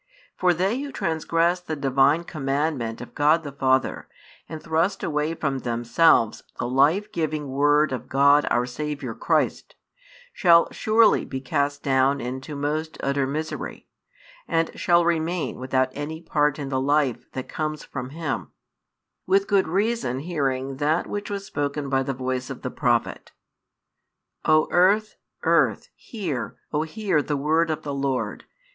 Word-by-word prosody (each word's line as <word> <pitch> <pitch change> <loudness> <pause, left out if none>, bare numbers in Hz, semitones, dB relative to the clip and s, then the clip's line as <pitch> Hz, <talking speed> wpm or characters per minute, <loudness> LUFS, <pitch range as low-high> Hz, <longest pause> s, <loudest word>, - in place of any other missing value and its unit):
For 180 -1 +3
they 190 +8 0
who 285 -1 -5
transgress 170 - 0
the 160 -3 -5
Divine 140 +3 +2
commandment 135 -6 -2
of 120 - -10
God 155 +3 +3
the 145 - -6
Father, 130 -1 0 0.4
and 160 - -6
thrust 165 +5 0
away 150 +1 -1
from 140 -4 -2
themselves 120 +1 +2 0.2
the - - -2
life 145 +11 +2
giving 155 -3 -2
word 145 +2 +3
of 125 -2 -5
God 140 +2 +4
our 120 +1 +2
Saviour 150 +4 -4
Christ, - - -1 0.6
shall 170 - +5
surely 220 0 +3
be 130 - -5
cast 145 +2 -1
down 135 0 +2
into 130 +4 -5
most 155 +3 -2
utter 140 -1 0
misery, 155 +3 -5 0.6
and 165 0 +1
shall 175 -2 +3
remain 170 0 -1
without 130 0 +1
any 145 +4 -5
part 150 -3 +1
in 140 -2 -5
the 130 -1 0
life 140 -2 0
that 130 - -5
comes 155 -1 -3
from 125 -2 -6
Him; 155 -1 -4 0.8
with 195 +1 +3
good 195 -3 +2
reason 190 - 0
hearing 135 -5 -2
that 155 +4 +1
which 205 0 -5
was 200 -1 -4
spoken 145 -3 -3
by 135 -1 +2
the 135 0 -3
voice 130 0 -3
of 135 - -8
the 130 - -3
prophet: 120 -2 -1 1.1
O 155 0 +4
earth, 200 +5 +3 0.3
earth, - - +2
hear, 175 - -5 0.2
O 150 - +1
hear 185 0 0
the 145 0 -2
word 160 +4 +1
of 155 0 -3
the 145 - -4
Lord. 130 -7 -2
150 Hz, 150 wpm, -24 LUFS, 135-165 Hz, 1.1 s, shall